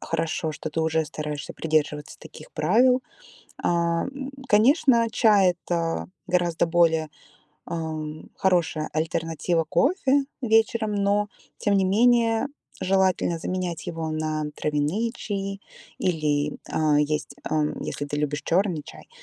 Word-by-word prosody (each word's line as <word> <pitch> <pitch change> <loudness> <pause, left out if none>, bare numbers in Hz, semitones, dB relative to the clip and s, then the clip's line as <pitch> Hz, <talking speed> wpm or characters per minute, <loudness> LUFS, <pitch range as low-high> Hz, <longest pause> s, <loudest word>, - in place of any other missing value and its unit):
хорошо, 160 -1 -2
что 155 - -6
ты 160 - -1
уже 160 0 +1
стараешься 150 -1 -5
придерживаться 150 -2 -1
таких - - -13
правил. 245 +11 +3 0.6
Эм, 175 +12 0 0.2
конечно, 235 +1 +4
чай- 200 -7 +4
это 165 - -1 0.2
гораздо 175 -2 +1
более, 165 -2 +2 0.6
эм, 155 -2 -5
хорошая 170 -4 +1
альтернатива 165 +1 -1
кофе 275 - +2 0.2
вечером, 225 -2 +2
но, 205 +1 +1 0.3
тем 205 - +1
не 195 - +3
менее, 230 +4 +3 0.3
желательно 190 -3 +2
заменять 180 -2 -3
его 160 -1 -3
на 155 0 -2
травяные 150 +10 0
чаи 195 -2 -4 0.4
или, 150 -4 0
э, 150 -2 +3
есть, 150 +1 -1 0.2
эм, 150 -1 0
если 145 - -4
ты 145 - -3
любишь 145 0 -1
черный 175 -3 +1
чай, - - -13
170 Hz, 120 wpm, -25 LUFS, 155-205 Hz, 0.6 s, конечно